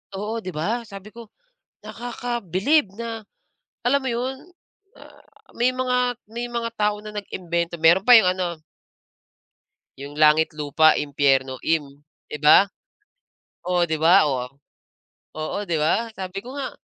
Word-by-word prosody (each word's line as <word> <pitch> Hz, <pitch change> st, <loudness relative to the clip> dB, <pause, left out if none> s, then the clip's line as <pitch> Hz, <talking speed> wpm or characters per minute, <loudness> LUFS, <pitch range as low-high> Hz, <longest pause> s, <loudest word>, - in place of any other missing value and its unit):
Oo, 210 Hz, +4 st, -4 dB
'di 185 Hz, -6 st, -8 dB
ba? 225 Hz, +9 st, -2 dB
Sabi 200 Hz, +1 st, -11 dB
ko, 235 Hz, 0 st, -12 dB, 0.5 s
"Nakakabilib 235 Hz, -, -1 dB
na," 225 Hz, 0 st, -6 dB, 0.6 s
alam 280 Hz, +3 st, +3 dB
mo 260 Hz, -, -2 dB
'yon, 245 Hz, +3 st, -2 dB, 0.6 s
ah, -, -, -17 dB, 0.3 s
"may 240 Hz, +2 st, +2 dB
mga 250 Hz, -1 st, -1 dB
may 235 Hz, +3 st, -5 dB
mga 235 Hz, -1 st, -3 dB
tao 210 Hz, -1 st, 0 dB
na 210 Hz, 0 st, -10 dB
nag-imbento." 170 Hz, -4 st, -4 dB
Meron 165 Hz, +4 st, +5 dB
pa 245 Hz, +2 st, +8 dB
'yung 185 Hz, -4 st, +3 dB
ano 175 Hz, -4 st, -4 dB, 1.4 s
yung 140 Hz, +2 st, -9 dB
langit, 155 Hz, +1 st, +4 dB
lupa, 150 Hz, +1 st, +3 dB
impiyerno, 135 Hz, -2 st, +1 dB
im 145 Hz, -4 st, -1 dB, 0.3 s
'di -, -, -5 dB
ba? 150 Hz, +7 st, +6 dB, 1.0 s
Oh, 180 Hz, -1 st, +2 dB
'di 160 Hz, -2 st, -2 dB
ba? 170 Hz, +5 st, +6 dB
Oh. 130 Hz, -4 st, -1 dB, 0.9 s
Oo, 155 Hz, +6 st, -4 dB
'di 170 Hz, -, -1 dB
ba? 160 Hz, +9 st, +1 dB
Sabi 190 Hz, 0 st, -6 dB
ko 250 Hz, +7 st, -10 dB
nga, 280 Hz, -2 st, -4 dB
195 Hz, 140 wpm, -23 LUFS, 160-235 Hz, 1.4 s, pa